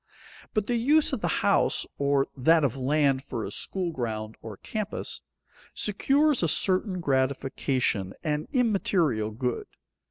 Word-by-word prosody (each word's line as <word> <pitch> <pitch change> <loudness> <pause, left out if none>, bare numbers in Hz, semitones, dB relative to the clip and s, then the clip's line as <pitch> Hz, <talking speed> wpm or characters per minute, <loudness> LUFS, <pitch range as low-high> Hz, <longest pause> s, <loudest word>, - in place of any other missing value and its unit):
But 215 -2 +1
the 240 +1 0
use 295 +6 +3
of - - -2
the - - 0 0.2
house, - - +2
or 140 -1 +2
that 160 +4 +4
of 135 -3 +1
land 135 0 +1
for 120 -5 -5
a - - -6
school 180 - -2
ground 110 -6 -4
or 110 -3 -8
campus, 215 -2 -4 0.5
secures 275 +7 +2
a 170 - +2
certain 185 +3 +1
gratification, 130 - 0
an 150 -1 -1
immaterial 190 - +1
good. 120 +2 -3
145 Hz, 135 wpm, -27 LUFS, 130-195 Hz, 0.5 s, that